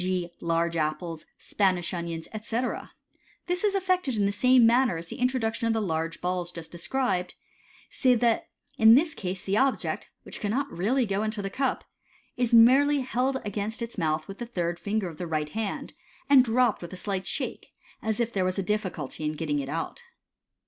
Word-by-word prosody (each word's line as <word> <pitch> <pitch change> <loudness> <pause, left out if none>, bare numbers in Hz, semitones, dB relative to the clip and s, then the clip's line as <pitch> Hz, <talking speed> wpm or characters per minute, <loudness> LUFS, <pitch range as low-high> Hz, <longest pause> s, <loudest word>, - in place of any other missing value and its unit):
g., 180 -2 -1
large 170 0 0
apples, 155 +1 -2
Spanish 185 -4 0
onions, 170 -2 -4
etc 230 +3 -3 0.5
This 360 +2 -1
is 410 -1 +2
effected 365 -8 +1
in 205 -2 +2
the 200 - +2
same 250 +4 +5
manner 240 -5 +4
as 165 0 -7
the - - -6
introduction 235 -3 0
of 225 - +2
the 225 - +1
large 165 -4 -2
balls 180 -1 -2
just 165 -2 -8
described, 185 +1 -1 0.6
save 250 -3 +3
that 235 -2 +2 0.3
in 220 +1 +9
this 310 +4 +3
case 185 - -4
the 195 +2 0
object, 270 +2 0 0.2
which - - -8
cannot 255 +7 -1
really 235 +9 +1
go 200 -1 -1
into 215 -1 -2
the 195 - -3
cup, 265 +2 -1 0.5
is 245 -1 0
merely 270 +5 +6
held 260 +1 0
against 205 +2 -3
its 230 - -6
mouth 155 -1 0
with 195 - -9
the 240 - -5
third 175 -6 -2
finger 200 -4 -2
202 160 - -7
MODERN - - -8
MAGIC. 150 0 -5
of - - -18
the 225 - -1
right - - 0
hand, - - -6 0.3
and 275 -2 +7
dropped 245 -1 +2
with 175 - -8
a - - -6
slight 190 0 -3
shake, - - -3 0.3
as 220 -1 -1
if 235 -1 0
there 190 -2 +1
a - - +2
as 185 - -2
a 195 - 0
difficulty 180 -8 -3
in 155 0 -1
getting 150 -2 -1
it 135 -1 -4
out. 165 - -4
205 Hz, 205 wpm, -27 LUFS, 175-245 Hz, 0.6 s, in